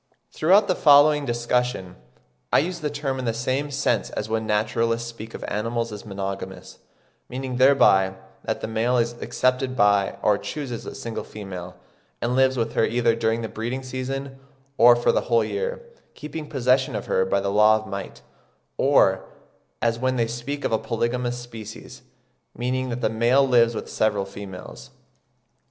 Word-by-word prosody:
Throughout 195 +6 +4
the 185 - +3
following 145 0 +5
discussion 120 -5 -1 0.6
I - - +5
use 175 +3 0
the 150 -2 -2
term 145 -2 -3
in 130 - -4
the 115 -1 -1
same 130 +5 -1
sense 140 0 0
as - - -4
when 110 0 -2
naturalists 115 +2 0
speak 115 -1 -9
of - - -8
animals 115 +2 -2
as 105 +1 -9
monogamous, 95 -1 -6 0.5
meaning 130 0 -4
thereby 110 -8 +5 0.3
that - - -3
the - - -3
male 115 +3 +1
is 115 0 +1
accepted 130 0 0
by 100 -3 +3
or 105 -1 +3
chooses 135 -6 -5
a - - -7
single 115 -2 -5
female, 90 -4 -8 0.4
and 120 +1 -1
lives 130 0 +3
with 115 -1 -1
her - - +2
either 120 0 +2
during 115 0 0
the - - -2
breeding 120 +5 -4
season 135 +1 -5 0.4
or 120 -2 +7
for 120 - +2
the - - +1
whole 115 -1 +4
year, 475 +3 -3 0.3
keeping 150 0 -7
possession 130 -1 +1
of 105 - -4
her 95 - +1
by 95 +1 +1
the 100 0 -2
law 105 +1 +5
of 110 0 -3
might; 100 -1 -7 0.5
or, - - +3 0.5
as 115 -1 +1
when 130 +1 0
they 115 -2 +1
speak 120 +5 -5
of - - 0
a 110 - +2
polygamous 120 +1 -2
species, 115 -3 -10 0.6
meaning 130 +1 -1
that 125 +1 -4
the - - +2
male 120 +5 +3
lives 120 -2 +4
with - - -5
several 105 -2 0
females. 95 -1 -10
120 Hz, 170 wpm, -24 LUFS, 110-130 Hz, 0.6 s, or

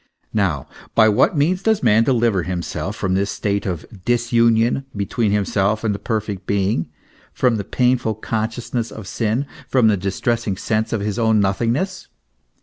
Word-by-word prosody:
Now, 95 -10 0 0.3
by 110 -1 +6
what 105 +9 +3
means 175 +6 +2
does 220 -4 +1
man 110 -1 +5
deliver 115 -6 +2
himself 90 +1 -4
from 95 -3 -1
this 100 +1 +1
state 100 0 -2
of 85 -4 -3 0.2
disunion 120 +1 +2
between 100 +2 0
himself 105 +1 +1
and 110 -2 +1
the 100 - -5
perfect 105 -4 -3
being, 95 -5 0 0.4
from 125 -3 +2
the 100 - -3
painful 125 -1 +1
consciousness 115 +2 -3
of 110 - -9
sin, 115 +7 -1 0.2
from 125 -4 +4
the 105 - +2
distressing 100 +2 -1
sense 110 +2 -1
of 115 - -1
his 105 +2 -2
own 110 -2 +3
nothingness? 115 - 0
110 Hz, 155 wpm, -20 LUFS, 100-120 Hz, 0.4 s, by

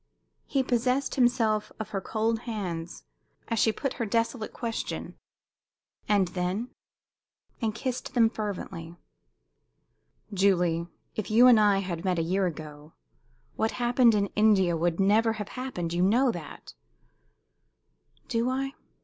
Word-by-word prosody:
He 275 -2 +1
possessed 255 +2 0
himself 230 -4 +2
of 220 - -5
her 195 - -3
cold 225 +2 -1
hands 175 -6 -5 0.5
as 230 -2 0
she 220 - +4
put 270 +4 -3
her - - +1
desolate 230 +1 -1
question 230 -2 -4 0.9
"And 200 -4 +3
then?" 185 +7 -2 0.9
and 220 -2 -1
kissed 255 +1 -4
them 230 -2 +6
fervently. 190 -6 -5 1.4
"Julie, 180 -4 +2 0.3
if 215 - -3
you 230 +3 +6
and 245 -3 +8
I 205 -2 +4
had 175 -3 -4
met 185 -2 0
a 165 - +1
year 185 +3 +1
ago, 150 -2 -8 0.6
what 220 - 0
happened 240 -1 +3
in 200 -1 0
India 200 -5 +4
would 170 +1 0
never 215 +3 +3
have 210 -2 -6
happened. 215 -10 -4
You 175 - 0
know 240 +7 +4
that!" 165 - -9 1.5
"Do 230 +2 0
I? 270 +1 -2
215 Hz, 130 wpm, -27 LUFS, 180-235 Hz, 1.5 s, and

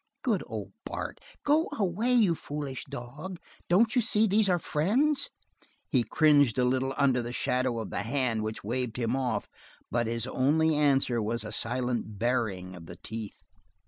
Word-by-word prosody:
Good - - +1
old - - -6
Bart, - - -5 0.2
go 305 +3 +3
away, 210 +4 0
you 220 -8 +5
foolish 145 -4 -5
dog! 145 +7 -7 0.3
Don't 220 +7 +4
you 245 - +5
see 220 -1 +5
these 210 0 +3
are 180 - +4
friends?" 255 - +1 0.6
He 125 -3 +3
cringed 145 -5 +4
a 125 - +3
little 130 +1 0
under 130 -3 +3
the 120 0 -5
shadow 125 -1 0
of 110 - -5
the - - -2
hand 115 -1 0
which 110 0 -4
waved 125 +2 -2
him 120 0 0
off 125 -4 -1 0.4
but 120 -1 +1
his 115 0 -1
only 150 +5 +2
answer 135 -5 +2
was 115 +2 -2
a 105 - -6
silent 120 -1 -2
baring 105 -6 -1
of 85 -2 -11
the - - -9
teeth. 110 -2 -7
130 Hz, 170 wpm, -29 LUFS, 115-165 Hz, 0.6 s, you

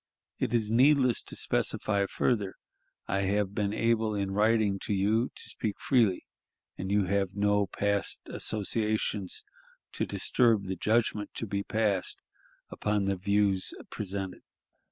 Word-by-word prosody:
It - - 0
is 110 -3 +1
needless 130 0 +4
to - - -6
specify 100 -2 +1
further. 100 -5 0 0.5
I 100 +1 0
have 100 0 0
been 105 -2 0
able 110 -1 +1
in 100 -1 -1
writing 105 -1 +2
to 105 - -2
you 110 +5 +2
to - - -5
speak 105 -3 -4
freely, 115 -8 +2 0.5
and 95 - -5
you 100 0 +3
have 95 +1 0
no 105 0 +2
past 100 +1 -1
associations 105 -2 -1 0.5
to - - -2
disturb 115 -5 +2
the 95 0 -3
judgment 105 +1 0
to - - -2
be 100 -1 -2
passed 105 -3 0 0.5
upon 105 -1 0
the 100 0 +1
views 100 0 +1 0.2
presented. 95 -2 -4
105 Hz, 135 wpm, -29 LUFS, 100-110 Hz, 0.5 s, needless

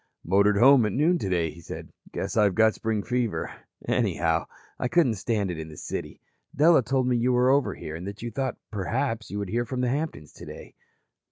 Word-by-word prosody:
"Motored 100 +3 +3
home 130 +3 +7
at 105 - -3
noon 165 +6 +2
today," 90 - 0
he 85 - -13
said. - - -9 0.2
"Guess - - -4
I've 105 -4 +3
got 110 -1 +4
spring 110 -2 -2
fever. 115 -10 -2 0.3
Anyhow, 80 -1 +1 0.3
I - - 0
couldn't 150 -4 +3
stand 105 -2 -1
it 85 - -6
in 80 0 -7
the 75 - -12
city. - - -6 0.4
Della 160 0 +5
told 130 +1 0
me 125 - +2
you 125 +2 +1
were 125 +1 +4
over 135 -8 +2
here 80 - -7
and 85 +3 -7
that 100 +2 -8
you 120 - -4
thought, 130 +3 -3
perhaps, 115 +3 -2
you 100 - -5
would 100 -2 -4
hear 120 +3 0
from 125 +2 -4
the 125 - +1
Hamptons 140 - -4
today." - - -11
110 Hz, 205 wpm, -26 LUFS, 95-125 Hz, 0.4 s, home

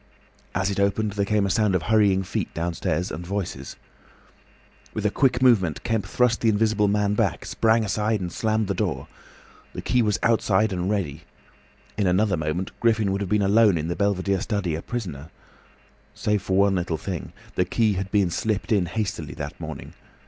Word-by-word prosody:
As 95 +2 +1
it 100 - -2
opened, 100 +2 +1
there 100 0 -1
came 105 -1 +2
a 100 - 0
sound 100 +1 +2
of 85 - 0
hurrying 100 0 +3
feet 90 - -3
downstairs 85 +1 -2
and 80 - -5
voices. 90 -7 -4 1.2
With 105 - -3
a 105 - +3
quick 130 -1 +2
movement 95 - +3
Kemp 115 -3 -1
thrust 125 -2 +1
the 115 - +3
Invisible 105 -1 +2
Man 105 0 +1
back, - - 0
sprang 110 0 +2
aside, 105 +1 0
and 90 -2 -4
slammed 110 +3 0
the 100 - 0
door. 85 -8 -2 0.7
The - - -5
key 125 +1 +2
was 105 -3 +1
outside 110 -2 +2
and 90 +1 -2
ready. 85 -8 -2 0.8
In 100 - +2
another 95 +2 +2
moment 80 +3 -2
Griffin 110 -4 +2
would 100 +1 -1
have 100 - -3
been 105 0 +2
alone 105 -1 +4
in 80 +1 -3
the 85 - -1
belvedere 100 -1 0
study, 100 -7 -1
a 80 - -3
prisoner. 85 - -5 0.9
Save 105 -1 0
for 95 -1 -1
one 100 0 +4
little 90 -3 -1
thing. 90 +1 -5 0.2
The - - +2
key 110 -3 +1
had 95 0 -3
been 100 -4 +2
slipped 110 +4 -2
in 100 -5 +2
hastily 95 -6 -3
that 75 -2 -6
morning. - - -7
100 Hz, 185 wpm, -24 LUFS, 90-110 Hz, 1.2 s, alone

